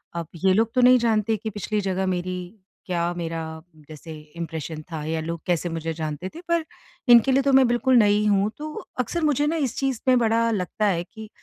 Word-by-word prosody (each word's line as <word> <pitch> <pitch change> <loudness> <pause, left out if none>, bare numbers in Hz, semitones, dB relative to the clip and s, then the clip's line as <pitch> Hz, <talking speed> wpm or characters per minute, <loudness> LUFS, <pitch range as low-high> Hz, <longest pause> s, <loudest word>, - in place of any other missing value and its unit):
अब 170 -2 -4 0.2
ये 190 -1 +5
लोग 225 +3 +1
तो 255 - +3
नहीं 250 +1 +7
जानते 225 -2 +1
कि 220 +2 -5
पिछली 210 0 -3
जगह 190 -1 -1
मेरी 180 +1 -3 0.5
क्या 175 -2 -1
मेरा 165 -1 -4 0.5
जैसे 155 +1 -10 0.2
इम्प्रेशन 160 -1 -5
था 160 -2 -4
या 160 +1 -2
लोग 165 +1 -5
कैसे 175 -1 0
मुझे 165 0 -3
जानते 155 +2 -5
थे 335 - -8
पर 340 -1 +1 0.5
इनके 235 +3 +6
लिए 265 +1 +4
तो 280 - +2
मैं 265 0 +6
बिल्कुल 240 +2 +2
नई 210 -1 +4
हूँ 200 0 +2
तो 305 +1 -6 0.3
अक्सर 250 +8 -1
मुझे 295 -1 +2
न 310 - 0
इस 235 - -8
चीज़ 270 -4 -1
में 255 -1 +5
बड़ा 230 0 +2
लगता 205 +1 -1
है 175 -4 +1
कि 220 +3 -12
205 Hz, 210 wpm, -24 LUFS, 170-240 Hz, 0.5 s, नहीं